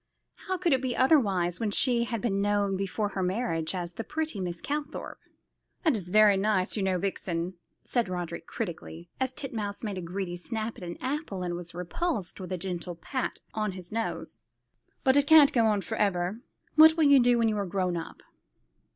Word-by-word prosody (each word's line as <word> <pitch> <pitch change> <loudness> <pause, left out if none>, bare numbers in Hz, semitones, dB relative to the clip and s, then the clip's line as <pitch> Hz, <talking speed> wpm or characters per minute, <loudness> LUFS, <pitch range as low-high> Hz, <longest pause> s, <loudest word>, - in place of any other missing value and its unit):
How 375 0 0
could 350 -4 +2
it 260 - +2
be 255 -2 -2
otherwise, 200 - +3
when 225 - 0
she 235 +2 +3
had 230 -2 -3
been 200 -4 0
known 205 -1 +1
before 195 +2 -2
her 195 -1 -3
marriage 180 -3 -1
as 175 -1 -4
"the 225 - -5
pretty 310 -4 -3
Miss 175 -2 -3
Calthorpe?" 295 - -4 0.7
"This 315 -6 +4
is 180 -2 -6
very 210 0 +6
nice, 195 -2 +1
you 210 - -1
know, 190 -1 +1
Vixen," 180 -2 -2 0.3
said 235 -6 0
Roderick 175 -2 -5
critically, 170 -4 -6
as 260 -1 0
Titmouse 220 -7 -4
made 205 -4 -3
a - - -5
greedy 180 +1 -4
snap 220 +5 -4
at - - -10
an 175 -1 -6
apple, 260 - -3
and 175 -1 -2
was 175 -1 -6
repulsed 195 - -3
with 185 0 -7
a 185 - -1
gentle 175 -1 -4
pat 255 - -4
on 215 -3 -1
his 180 -2 -9
nose, 225 +1 -4 0.6
"but 265 -1 +4
it 285 0 +4
can't 310 -3 +8
go 230 -3 +4
on 210 -2 +2
for 220 +2 -5
ever. 195 0 0 0.4
What'll 320 +1 +7
you 285 -2 +7
do 245 -1 +4
when 230 -1 +3
you 215 -1 0
are 200 - -1
grown 180 -1 -1
up?" 165 - -7
205 Hz, 195 wpm, -28 LUFS, 180-245 Hz, 0.7 s, can't